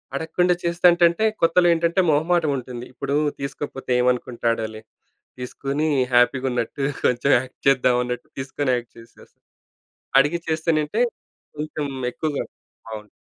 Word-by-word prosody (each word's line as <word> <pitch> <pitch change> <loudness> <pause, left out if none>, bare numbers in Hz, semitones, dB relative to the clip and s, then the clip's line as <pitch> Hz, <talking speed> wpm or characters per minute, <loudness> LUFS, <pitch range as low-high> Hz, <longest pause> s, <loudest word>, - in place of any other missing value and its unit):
అడగకుండా 170 +4 +1
చేస్తంటంటే 170 +1 +3 0.2
కొత్తలో 170 +2 +4
ఏంటంటే 170 +3 +1
మొహమాటం 160 +1 +2
ఉంటుంది. 125 -1 -7
ఇప్పుడు 140 +2 -3 0.2
తీసుకోకపోతే 140 -1 -5
ఏమనుకుంటాడాలే 115 -3 -1 0.6
తీసుకొని 140 +4 -2 0.3
హ్యాపీగున్నట్టు 125 +1 +1 0.2
కొంచెం 125 +3 +2
యాక్ట్ 130 +1 -8
చేద్దాం. 125 -2 +4
అన్నట్టు 125 0 -5
తీసుకొని 135 0 -2
యాక్ట్ 120 -1 -7
చేసేస్. 115 0 -17 0.9
అడిగి 150 +5 +1
చేస్తేనంటే 160 +5 0 0.5
కొంచెం 150 0 -4 0.3
ఎక్కువగా 150 0 -2 0.5
అవును. 105 -1 -8
140 Hz, 105 wpm, -22 LUFS, 125-165 Hz, 0.9 s, కొత్తలో